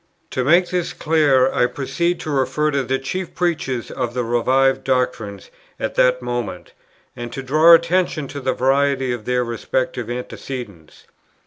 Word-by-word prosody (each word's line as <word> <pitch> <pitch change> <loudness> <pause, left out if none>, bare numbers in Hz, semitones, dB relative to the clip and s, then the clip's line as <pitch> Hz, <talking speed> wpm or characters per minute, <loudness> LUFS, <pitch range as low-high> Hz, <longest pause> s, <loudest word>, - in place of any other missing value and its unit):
To 130 - -1
make 175 +6 +3
this 180 -2 -1
clear, 145 -5 +3
I 125 - +3
proceed 145 +7 -2
to 155 - -4
refer 140 +3 +1
to 140 -1 +1
the 130 +1 -1
chief 170 +7 -5
preachers 150 -9 -2
of 120 0 -3
the 125 - 0
revived 130 +3 +2
doctrines 125 -6 -2 0.3
at - - -2
that 125 0 +2
moment, 120 -2 -4 0.4
and 120 0 -6
to 135 - -5
draw 155 +6 +7
attention 170 -3 0
to 145 - -6
the 130 -1 -1
variety 135 0 +1
of 120 -3 -5
their 125 0 +1
respective 120 0 -3
antecedents. 120 - -7
130 Hz, 155 wpm, -20 LUFS, 125-150 Hz, 0.4 s, draw